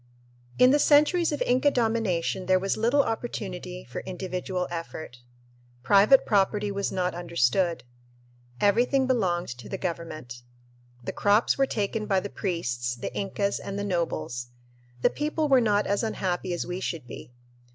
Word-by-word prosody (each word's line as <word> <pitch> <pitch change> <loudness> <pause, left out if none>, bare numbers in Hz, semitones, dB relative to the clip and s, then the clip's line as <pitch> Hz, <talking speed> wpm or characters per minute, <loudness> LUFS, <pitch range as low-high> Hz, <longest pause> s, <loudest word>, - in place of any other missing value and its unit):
In 250 +1 +6
the 295 - +4
centuries 305 +4 +4
of 295 - -1
Inca 255 +4 +3
domination 220 -8 0
there 185 0 +5
was 195 +1 -1
little 240 +6 +3
opportunity - - -5
for - - -6
individual 180 0 -4
effort. 165 -6 -6 0.7
Private 200 - +6
property 205 +1 +1
was 200 0 -2
not 180 -1 -1
understood. 170 0 0 0.8
Everything 245 - +3
belonged 190 -9 0
to 120 -3 -8
the - - -3
government. 160 -8 -5 0.6
The - - -4
crops 205 +3 +3
were 270 0 +2
taken 210 -1 -2
by 195 -2 +2
the 200 +2 -6
priests, 125 - -2
the 120 - -6
Incas 200 0 -1
and 195 - -6
the 200 - -2
nobles. 120 - -2 0.6
The - - +4
people 305 +1 -1
were 265 -3 +5
not 210 -2 +2
as 200 - 0
unhappy 185 -5 -2
as 175 - -2
we 180 +1 -4
should 165 -7 -4
be. 120 - -10
195 Hz, 150 wpm, -26 LUFS, 170-225 Hz, 0.8 s, In